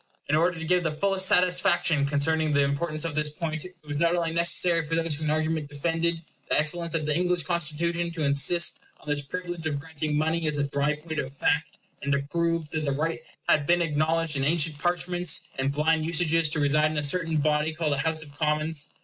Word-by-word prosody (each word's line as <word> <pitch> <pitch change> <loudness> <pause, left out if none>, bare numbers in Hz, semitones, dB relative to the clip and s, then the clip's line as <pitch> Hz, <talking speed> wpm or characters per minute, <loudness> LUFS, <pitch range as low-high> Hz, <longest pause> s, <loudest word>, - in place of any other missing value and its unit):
In 150 - +2
order 170 +2 +2
to 165 - -5
give 180 +2 +2
the 165 - 0
fullest 190 +3 +1
satisfaction 180 -5 +3
concerning 155 +2 +1
the 140 -1 +3
importance 155 +3 -2
of 165 - -3
this 150 0 0
point, 155 +1 -4
it 180 - -11
was 145 0 -3
not 170 +2 +2
only 165 -2 -1
necessary 170 0 +3
for 160 +1 -3
those 165 -2 +1
who 155 +2 -4
in - - 0
argument 155 -1 -1
defended 165 +3 -1 0.3
the - - +2
excellence 170 +2 +1
of 155 -2 -1
the 150 -1 +1
English 180 0 +1
Constitution 170 +1 -2
to 165 -2 -3
insist 140 +5 +3 0.2
on - - -20
this 145 -1 0
privilege 175 +2 -5
of 145 -2 -2
granting 150 0 -3
money 160 +1 0
as 150 -1 -1
a 145 - +1
dry 140 +1 0
point 160 +1 -6
of 130 - -4
fact, 145 +2 -1 0.2
and 140 - -2
to 140 - +2
prove 170 -1 0
that 160 -1 -2
the 140 - 0
right 160 +4 -2 0.3
had 145 -1 +3
been 175 0 +3
acknowledged 160 0 0
in 135 - -1
ancient 155 0 +2
parchments 175 0 0 0.2
and 135 +1 +1
blind 155 +2 +1
usages 165 -1 +2
to 150 - 0
reside 150 +1 +3
in 155 - -4
a 150 - 0
certain 165 +2 +1
body 150 +1 +1
called 155 -2 -1
a - - -1
House 160 +2 -1
of 145 -2 -14
Commons. 155 0 -1
160 Hz, 220 wpm, -26 LUFS, 150-170 Hz, 0.3 s, satisfaction